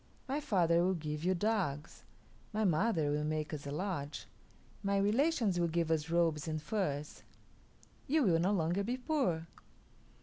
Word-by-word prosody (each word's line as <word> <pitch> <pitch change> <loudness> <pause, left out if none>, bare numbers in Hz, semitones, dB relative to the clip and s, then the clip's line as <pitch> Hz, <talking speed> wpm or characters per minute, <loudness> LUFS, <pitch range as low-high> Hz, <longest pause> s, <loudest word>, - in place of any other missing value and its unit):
My 275 +3 -1
father 170 - +2
will 185 +1 +2
give 150 -1 -4
you 185 +1 +2
dogs; 175 -7 -2 0.5
my 215 +1 0
mother 165 -3 +2
will 150 +1 0
make 155 0 -2
us 145 -1 -5
a - - -4
lodge; 155 -3 -3 0.6
my 200 0 +1
relations 215 - +2
will 170 - +2
give 165 0 0
us 160 -1 0
robes 165 -2 +1
and 155 -1 -2
furs; 150 -5 -3 0.9
you 300 +2 +3
will 170 -7 +3
no 180 +4 +2
longer 175 0 +1
be 245 +5 -2
poor." 250 - 0
170 Hz, 160 wpm, -34 LUFS, 155-205 Hz, 0.9 s, you